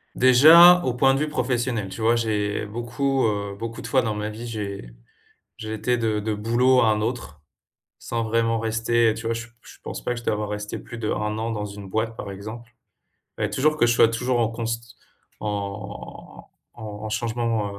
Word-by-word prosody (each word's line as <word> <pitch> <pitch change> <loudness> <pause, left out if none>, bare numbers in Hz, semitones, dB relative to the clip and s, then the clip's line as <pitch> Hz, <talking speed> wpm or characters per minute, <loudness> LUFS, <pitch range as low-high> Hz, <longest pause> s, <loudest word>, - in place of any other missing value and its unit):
Déjà, 160 +8 +8
au 125 - 0
point 135 +2 +3
de 135 - 0
vue 150 0 -1
professionnel, 120 -7 -1
tu 95 +4 -8
vois, 115 +1 +3
j'ai 105 -2 -1
beaucoup, 120 +5 -1
heu, 100 -1 -3
beaucoup 115 +1 -6
de - - -7
fois 130 - +3
dans 110 -2 -2
ma 105 0 -3
vie, 115 +3 -8
j'ai 100 - -5 0.7
j'ai 110 0 -6
été 125 +3 0
de 110 -2 0
de 105 +1 -2
boulot 120 +5 +3
à 115 - +3
un 105 - 0
autre, 110 - -4 0.6
sans 115 -1 -3
vraiment 115 0 +1
rester. 115 +1 +1
Heu, - - -2
tu 115 - -8
vois, 115 - 0
je 115 +1 -6
je - - -15
pense - - -6
pas 125 - -2
que 120 - -6
je 120 - -14
dois - - 0
avoir 105 0 -3
rester 105 0 -5
plus 120 - -10
d'1 110 -2 -2 0.3
an 115 +1 -2
dans 105 -2 -3
une 100 -1 -9
boîte, 110 +2 -2
par 100 - -7
exemple. 110 +5 -9 0.6
Fallait - - -1
toujours 155 +3 +1
que 150 - +3
je 120 - +3
sois 115 - +6
toujours 120 +2 -1
en 115 - +2
const... 115 0 -5 0.5
en 100 -1 -6 0.3
en 115 - -11 0.2
en 110 - -4
changement, 115 -2 -2
115 Hz, 205 wpm, -24 LUFS, 105-120 Hz, 0.7 s, Déjà